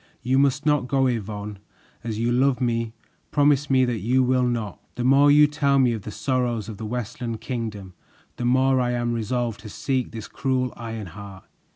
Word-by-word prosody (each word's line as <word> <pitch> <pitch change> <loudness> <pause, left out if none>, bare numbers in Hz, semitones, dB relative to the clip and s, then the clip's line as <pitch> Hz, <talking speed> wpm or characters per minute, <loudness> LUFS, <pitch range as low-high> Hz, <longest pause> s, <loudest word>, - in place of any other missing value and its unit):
You 130 +2 +2
must 140 +1 +2
not 150 -4 +2
go, 135 0 +2
Yvonne; 105 -4 -3 0.4
as 110 -2 -3
you 115 +2 0
love 130 +1 +2
me, 115 -2 -1 0.3
promise 145 0 +3
me 130 -1 +4
that 120 -3 -2
you 125 +6 +2
will 130 0 +2
not." 115 -4 -3
"The 125 - -3
more 135 +3 +5
you 150 +1 +7
tell 145 -2 +1
me 125 -3 +4
of 110 - -4
the 100 - -7
sorrows 125 -3 -1
of 110 -3 -7
the 110 +1 -5
Westland 120 0 -4
Kingdom, 105 -7 -5 0.4
the 120 - -3
more 130 +1 +3
I 125 0 0
am 120 -1 -1
resolved 115 0 -2
to 105 - -10
seek 130 +4 -2
this 110 -2 -8
cruel 130 -2 -1
Ironheart. 100 -4 -8
120 Hz, 190 wpm, -24 LUFS, 110-130 Hz, 0.4 s, you